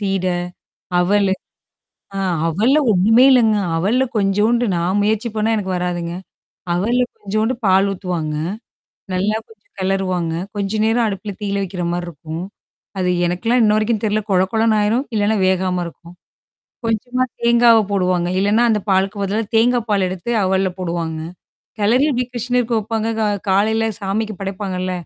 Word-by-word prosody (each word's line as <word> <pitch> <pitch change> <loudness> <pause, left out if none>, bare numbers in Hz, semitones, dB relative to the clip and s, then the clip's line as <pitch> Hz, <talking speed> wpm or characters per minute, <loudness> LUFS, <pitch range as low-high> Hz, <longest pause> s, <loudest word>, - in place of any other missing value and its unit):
சீட, 195 -2 -1 0.7
அவலு. 195 +1 +2 0.8
ஆ - - -2 0.3
அவல்ல 220 - +2
ஒண்ணுமே 215 +6 +5
இல்லங்க. 230 -4 +4 0.2
அவல்ல 215 +10 +2
கொஞ்சோன்ட்டு 210 +4 +2
நான் 175 +4 0
முயற்சி 220 +2 0
பண்ணா 220 +1 +1
எனக்கு 190 -3 -3
வராதுங்க. 175 -1 -3 0.6
அவல்ல 235 +8 +1 0.2
கொஞ்சோண்டு 215 +4 -1
பால் 190 +1 +4
ஊத்துவாங்க. 175 -5 -3 0.8
நல்லா 200 +4 0
கொஞ்சம் 220 -2 -22
கெளருவாங்க. 185 -3 -1 0.2
கொஞ்ச 200 -1 -2
நேரம் 230 +1 +2
அடுப்புல 200 0 -4
தீயில 200 -1 -1
வைக்கிறமாரி 175 -2 -3
இருக்கும். 160 +1 -7 0.6
அது 180 -1 +1 0.2
எனக்குல்லாம் 225 +8 +1
இன்ன 210 -1 +4
வரைக்கும் 215 0 0
தெர்ல. 215 0 +1
கொழ 185 -1 +4
கொழன்னு 225 -1 +2
ஆயிரும், 225 +6 +1
இல்லன்னா 210 +1 +2
வேகாம 185 -1 0
இருக்கும். 170 0 -11 0.7
கொஞ்சமா 235 +3 -1 0.2
தேங்காவ 235 -1 +5
போடுவாங்க. 180 -3 +1
இல்லன்னா, 205 +4 +3
அந்த 215 -1 +1
பாலுக்கு 195 +2 +1
பதில 200 +2 -1 0.2
தேங்காய் 235 +1 +3
பால் 200 -3 +2
எடுத்து 185 +4 -5
அவல்ல 190 0 +1
போடுவாங்க. 170 -3 -3 0.6
கெளரி 235 +7 +3
இப்பிடி 250 -1 0
கிருஷ்ணருக்கு 245 0 0
வைப்பாங்க. 220 +1 -2
க - - +1 0.3
காலையில 220 +3 +2
சாமிக்கு 210 +2 -2
படைப்பாங்கல்ல. 190 -2 -3
200 Hz, 135 wpm, -19 LUFS, 185-225 Hz, 0.8 s, ஒண்ணுமே